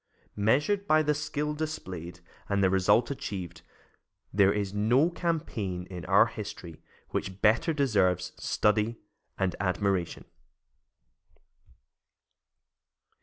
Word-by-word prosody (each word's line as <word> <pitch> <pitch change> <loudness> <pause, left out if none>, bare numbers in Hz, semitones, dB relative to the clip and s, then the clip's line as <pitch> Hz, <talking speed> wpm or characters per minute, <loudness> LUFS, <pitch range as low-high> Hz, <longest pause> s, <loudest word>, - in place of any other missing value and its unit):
Measured 145 - +1
by 155 0 +4
the 150 0 +2
skill 150 0 -2
displayed 90 - -6 0.3
and 100 -1 +1
the 95 - +4
result 95 +7 +3
achieved, 95 - -6 0.7
there 100 0 +5
is 100 -2 -2
no 120 +11 +3
campaign 130 - -3
in 90 -2 -7
our - - +5
history 85 -2 -8 0.3
which 95 0 -4
better 110 +9 +4
deserves 95 - +1
study 105 +2 +1 0.4
and 95 -2 0
admiration. 95 -1 -1
105 Hz, 100 wpm, -28 LUFS, 95-145 Hz, 0.7 s, there